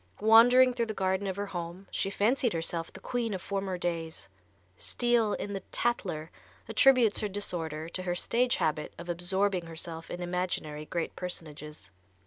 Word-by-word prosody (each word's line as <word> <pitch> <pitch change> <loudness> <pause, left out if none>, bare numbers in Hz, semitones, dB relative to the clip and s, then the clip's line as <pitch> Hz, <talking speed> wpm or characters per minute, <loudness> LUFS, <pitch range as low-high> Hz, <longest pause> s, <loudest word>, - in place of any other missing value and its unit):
Wandering 245 +4 +7
through 235 -2 -1
the 215 - -4
garden 190 +1 0
of 190 - -2
her 200 +1 -2
home 175 0 -6
she 195 - 0
fancied 230 +4 +2
herself 165 0 -2
the - - -11
queen 235 -4 -2
of 185 - -5
former 195 -2 -2
days. 165 -2 -3 0.5
Steele, 235 - +1
in 205 - -4
the 195 - -2
"Tattler," 180 -9 -1 0.4
attributes 255 -6 +5
her 210 - -1
disorder 165 -6 -3
to 185 - -2
her 180 -1 -1
stage 245 +7 +2
habit 150 -1 -1
of 170 +1 -9
absorbing 180 +1 0
herself 165 0 -6
in 175 - -5
imaginary 175 -4 -2
great 170 -1 -3
personages. 150 - -6
185 Hz, 160 wpm, -30 LUFS, 165-215 Hz, 0.5 s, Wandering